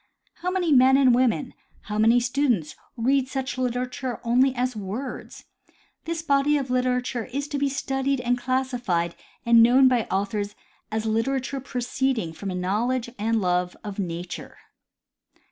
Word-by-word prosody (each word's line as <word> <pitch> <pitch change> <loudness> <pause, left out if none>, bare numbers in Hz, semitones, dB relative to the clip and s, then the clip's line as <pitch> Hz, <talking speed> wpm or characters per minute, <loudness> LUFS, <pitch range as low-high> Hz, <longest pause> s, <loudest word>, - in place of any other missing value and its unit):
How 360 - -1
many 365 -3 0
men 265 0 +6
and 260 -3 +5
women, 255 +1 +1 0.3
how 210 0 -4
many 230 +3 +5
students, 240 - 0 0.2
read 260 +3 +2
such 265 0 -3
literature 250 -1 -2
only 255 +3 +3
as 250 0 -1
words. 210 +6 -6 0.6
This 330 -1 -3
body 285 0 +3
of 265 -3 -3
literature 250 -1 0
is 280 +3 -4
to 290 -2 -2
be 280 0 +1
studied 270 0 -1
and 245 0 +1
classified 245 -9 -1 0.3
and 235 -1 +6
known 255 +3 +6
by 245 -3 +2
authors 205 +1 -2 0.4
as 220 0 -2
literature 260 +5 -1
proceeding 250 -6 -2
from 180 +5 -6
a 185 - -3
knowledge 230 +7 -1
and 225 +2 +1
love 180 -1 0
of 205 -1 -6
nature. 175 -1 -5
250 Hz, 145 wpm, -25 LUFS, 215-265 Hz, 0.6 s, men